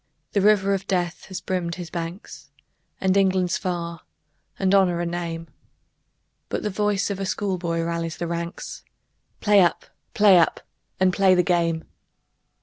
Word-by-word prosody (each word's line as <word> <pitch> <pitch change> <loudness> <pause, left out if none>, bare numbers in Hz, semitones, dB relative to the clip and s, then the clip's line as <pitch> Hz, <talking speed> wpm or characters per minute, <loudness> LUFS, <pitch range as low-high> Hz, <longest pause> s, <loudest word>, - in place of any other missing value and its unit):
The 200 - +1
river 200 -1 +4
of 195 0 -3
death 175 -3 -1
has 185 -1 -6
brimmed 175 -2 -2
his 175 -3 -8
banks, 170 +3 -7 0.5
And 190 0 +2
England's 185 -2 +2
far 170 -3 -4 0.6
and 190 0 +1
Honor 185 -3 +4
a 175 - -1
name, 170 -1 -4 1.0
But - - -3
the 210 - -1
voice 205 0 0
of 195 - -4
a 195 - -2
schoolboy 180 -4 -1
rallies 165 -1 -3
the 175 - -3
ranks, 170 0 -5 0.6
"Play 205 -1 +5
up! 175 - +1 0.3
Play 200 -4 +7
up! 165 - +2 0.4
And 185 -1 +3
play 190 -1 +4
the 180 - +3
game!" 170 -2 +1
180 Hz, 150 wpm, -24 LUFS, 170-195 Hz, 1.0 s, Play